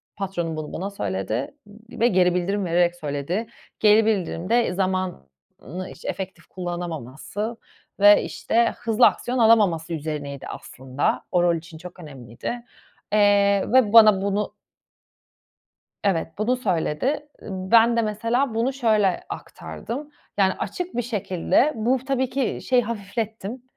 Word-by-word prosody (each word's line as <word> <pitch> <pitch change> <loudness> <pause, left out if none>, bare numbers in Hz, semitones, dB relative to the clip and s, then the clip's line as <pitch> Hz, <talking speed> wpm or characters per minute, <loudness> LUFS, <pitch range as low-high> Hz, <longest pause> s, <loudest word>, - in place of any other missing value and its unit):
Patronum 175 -4 -3
bunu 155 -1 -6
bana 190 +4 -3
söyledi, 110 - -3
ııı, 205 +1 -15 0.2
ve 235 - +5
geri 180 -4 +3
bildirim 195 +3 -1
vererek 175 0 +2
söyledi. 155 +7 -3 0.3
Geri 215 +1 +5
bildirim 185 -4 -1
de 235 -5 +2
zamanı 180 - -4
iş - - -16
efektif 185 -3 -5
kullanamaması 175 - -5 0.4
ve, 205 +1 +7
işte, 235 +1 0
hızlı 225 -2 +3
aksiyon 250 +1 -2
alamaması 200 -8 +3
üzerineydi, 145 -3 -5
aslında. 130 +2 -3
O 175 -1 +3
rol 175 -1 +3
için 165 0 -9
çok 180 +2 -11
önemliydi. 135 - -7 0.5
Eee, 200 -1 +4
ve 245 -5 +4
bana 215 -4 +8
bunu 200 +1 -1 1.5
Evet, 185 -6 +1
bunu 235 +4 +1
söyledi. 250 - -1
Iıı, 190 -2 -6
ben 230 0 +6
de, 230 - +3
mesela, 230 +4 0
bunu 235 +4 0
şöyle 215 -8 +2
aktardım. 290 +6 -7 0.3
Yani, 190 -1 +4
açık 355 - -5
bir 245 - +1
şekilde 220 - +1
bu, 240 +4 +1
tabii 260 -2 0
ki, 265 -2 -1
şeyi 250 -1 +4
hafiflettim. 220 +1 -5
200 Hz, 130 wpm, -23 LUFS, 170-230 Hz, 1.5 s, bana